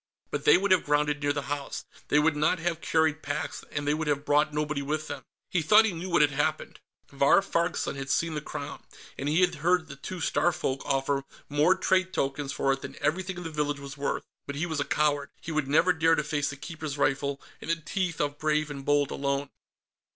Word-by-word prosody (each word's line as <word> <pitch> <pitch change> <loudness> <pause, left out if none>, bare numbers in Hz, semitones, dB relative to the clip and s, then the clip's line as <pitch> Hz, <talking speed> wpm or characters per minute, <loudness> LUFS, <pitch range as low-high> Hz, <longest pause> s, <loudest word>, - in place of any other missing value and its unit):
But - - -3
they 445 - +8
would 200 0 0
have 185 - +5
grounded 150 0 +1
near 145 -1 +2
the 145 -1 -2
house, 145 0 -4 0.2
they 150 - +3
would 150 +1 +3
not 155 +4 +2
have 170 -1 -2
carried 160 -1 +2
packs, 145 +1 -4
and 145 0 -3
they 145 - +3
would 155 0 -2
have 145 0 0
brought 150 +1 +3
nobody 150 -1 -1
with 150 +2 -2
them. 145 -2 -5 0.3
He 180 - +2
thought 215 +8 +6
he 220 - +1
knew 175 +2 -5
what 170 -4 +5
had 145 - +3
happened. 140 +1 -1 0.3
Vahr 140 +5 +5
Farg's 170 -3 0
son - - -2
had 135 -1 -6
seen 165 +4 +1
the 150 - -3
Crown, - - -6 0.3
and 140 - -2
he 160 +4 +3
had 180 -1 +3
heard 175 0 +3
the 140 -3 -9
two 175 +6 -7
Starfolk 145 -3 0
offer 135 0 +1 0.3
more 150 +5 +4
trade 185 0 +1
tokens 135 -1 -1
for 135 0 +1
it 135 - -5
than - - -7
everything 180 +5 -1
in 180 - -6
the 165 - -5
village 145 -1 -1
was 140 0 -8
worth. 140 -1 -2 0.2
But 140 - -4
he 155 +4 -1
was 160 -3 -2
a 145 - 0
coward; 145 -2 +1
he 165 - -6
would 155 -3 0
never 165 +6 +4
dare 165 0 +3
to 150 - 0
face 145 -1 -1
the 145 - -6
Keeper's 150 0 -6
rifle 140 0 0 0.2
and - - -7
the 165 - +3
teeth 170 +1 -3
of 145 0 -1
Brave 155 -1 +1
and 140 -1 -6
Bold 145 0 +2
alone. 140 0 -1
150 Hz, 230 wpm, -28 LUFS, 145-165 Hz, 0.3 s, they